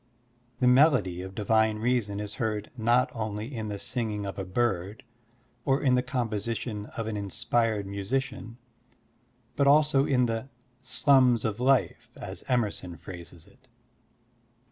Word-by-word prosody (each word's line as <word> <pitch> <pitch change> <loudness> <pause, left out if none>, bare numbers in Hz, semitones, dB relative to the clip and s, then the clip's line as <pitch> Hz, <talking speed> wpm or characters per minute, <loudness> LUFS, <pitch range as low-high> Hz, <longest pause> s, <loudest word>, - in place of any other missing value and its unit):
The 125 - +3
melody 125 - +4
of 95 +1 -8
divine 110 +1 +2
reason 110 -3 0
is 105 0 -5
heard 105 -2 -2
not 120 +2 +2
only 110 +2 -4
in 110 -1 -4
the 105 -1 -4
singing 105 -1 -3
of 100 0 -5
a - - -2
bird 95 -1 -1 0.6
or 135 0 +2
in 130 -3 +2
the 125 - +4
com 125 -1 -2
position 105 0 -4
of 115 - -2
an 110 -1 -3
inspired 105 +1 0
musician, 115 +4 -3 1.0
but 140 - +2
also 145 -1 +4
in 125 -3 +3
the 115 +3 -3 0.2
*' 125 +1 -39
sltmis 130 -2 +3
of 110 0 -2
life 130 +1 +1
" - - -34
as - - -8
Emerson 105 -8 -1
phrases 85 -1 -10
it. 130 +1 -24
115 Hz, 150 wpm, -28 LUFS, 105-125 Hz, 1.0 s, melody